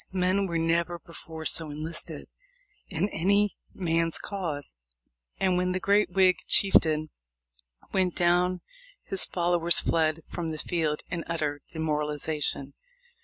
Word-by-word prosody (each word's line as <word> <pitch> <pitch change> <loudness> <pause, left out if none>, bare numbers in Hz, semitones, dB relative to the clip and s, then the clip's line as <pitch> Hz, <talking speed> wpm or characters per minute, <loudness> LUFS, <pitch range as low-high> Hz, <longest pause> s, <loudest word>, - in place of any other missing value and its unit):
Men 190 +1 +1
were 170 -2 -1
never 170 +1 +1
before 160 -1 -10
so 160 -1 +1
enlisted 155 +3 -4 0.6
in 185 +2 +1
any 200 +3 +2
man's 165 -2 0
cause, 160 - -4 0.6
and 185 -2 +2
when 180 0 +1
the 185 - -1
great 200 0 +3
Whig 185 0 +4
chief 195 -1 +3
tain 155 -1 -1 0.8
went 185 -2 +2
down 180 +1 +2 0.4
his 195 - +1
followers 175 -1 +2
fled 160 -1 +1
from 170 -2 -4
the 155 - -4
field 155 -2 -1
in 170 -2 -2
utter 150 -3 -2
demoralization. 150 -2 -1
170 Hz, 125 wpm, -28 LUFS, 160-185 Hz, 0.8 s, Whig